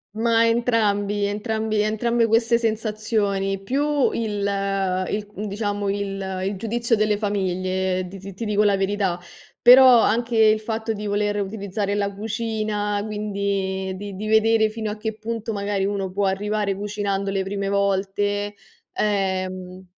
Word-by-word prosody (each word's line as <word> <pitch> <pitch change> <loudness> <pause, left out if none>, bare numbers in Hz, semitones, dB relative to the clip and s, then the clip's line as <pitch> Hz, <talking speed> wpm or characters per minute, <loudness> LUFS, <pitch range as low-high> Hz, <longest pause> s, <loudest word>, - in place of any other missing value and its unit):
Ma 230 0 +3
entrambi 210 -4 +1
entrambi 215 +1 -1
entrambe 230 +2 +1
queste 230 +1 +3
sensazioni, 215 -3 -1
più 285 +4 +1
il 205 -3 -2 0.6
i 210 0 -2 0.2
diciamo, 205 0 -2
il 195 -2 -3
il 200 - -1
giudizio 230 +3 0
delle 215 -1 +1
famiglie, 185 -2 -1
ti 195 +2 -10
ti 195 +1 -8
ti 230 - -5
dico 210 0 +1
la 200 -1 +3
verità. 195 -2 0 0.4
Però 250 -1 +8
anche 235 +2 +1
il 215 -1 +5
fatto 220 0 -3
di 210 0 -5
voler 205 0 0
utilizzare 200 0 -3
la 200 -1 -1
cucina, 215 -1 -2
quindi 200 -2 -2
di 200 0 -7
di 215 +3 -5
vedere 220 0 +4
fino 215 -1 -4
a 210 - -6
che 220 0 -4
punto 225 0 -4
magari 200 -1 -1
uno 195 -2 -2
può 200 +2 0
arrivare 205 +1 -1
cucinando 200 -1 -2
le 195 - 0
prime 195 0 -3
volte, 200 +1 0 0.4
ehm 185 -2 -2
205 Hz, 140 wpm, -23 LUFS, 195-220 Hz, 0.6 s, Però